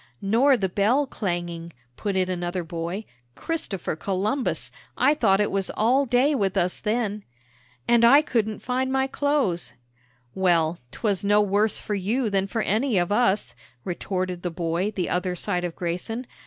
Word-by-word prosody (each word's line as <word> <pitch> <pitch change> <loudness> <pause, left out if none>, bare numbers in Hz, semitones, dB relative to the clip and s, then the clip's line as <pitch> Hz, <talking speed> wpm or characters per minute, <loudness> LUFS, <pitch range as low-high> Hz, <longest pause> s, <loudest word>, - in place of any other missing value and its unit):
"Nor 245 +7 +3
the 195 - 0
bell 215 +10 +2
clanging," 175 -7 -4 0.2
put 200 -2 -3
in 185 -1 +2
another 175 0 -2
boy; 170 +5 -4 0.3
"Christopher 310 - -3
Columbus, 200 - -1 0.3
I 290 - +4
thought 210 -10 +3
it 210 - +1
was 195 -1 -1
all 255 +6 +3
day 250 +5 +3
with 200 -8 0
us 180 +1 0
then!" 215 -2 -1 0.6
"And 235 -1 +4
I 275 +6 +7
couldn't 220 -6 -1
find 260 +1 -1
my 265 0 +2
clothes!" 265 - 0 0.6
"Well, 170 -3 +2
'twas 205 - -1
no 205 +1 +4
worse 205 +1 +2
for 210 - -4
you 215 +4 0
than 195 0 +1
for 225 +2 -2
any 225 +1 +1
of 175 +1 +1
us," 205 - +2 0.3
retorted 185 0 -3
the 180 - -2
boy 170 +3 -1
the 190 -4 -3
other 180 0 -1
side 180 -1 -2
of 175 -2 -4
Grayson. 185 +8 -3
200 Hz, 160 wpm, -25 LUFS, 180-235 Hz, 0.6 s, I